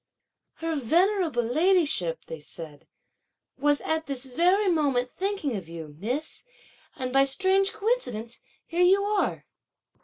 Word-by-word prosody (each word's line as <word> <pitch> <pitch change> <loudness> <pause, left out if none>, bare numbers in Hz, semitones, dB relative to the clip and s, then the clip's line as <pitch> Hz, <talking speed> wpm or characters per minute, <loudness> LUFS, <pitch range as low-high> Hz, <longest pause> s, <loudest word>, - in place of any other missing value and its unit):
"Her 330 0 -3
venerable 330 - +2
ladyship," 300 - +2
they 160 - -8
said, 150 0 -10 0.7
"was 290 +1 +1
at 320 0 -2
this 270 -2 -3
very 360 +10 +2
moment 280 -8 +1
thinking 385 - -2
of 185 -5 -6
you, 160 -3 -9
miss, 255 - -3 0.5
and, 255 -1 -4
by 270 - +5
a 275 - +3
strange 380 +8 +3
coincidence, 250 - -2 0.2
here 345 +1 -2
you 385 +3 +5
are." 410 0 -1
295 Hz, 130 wpm, -26 LUFS, 240-375 Hz, 0.7 s, by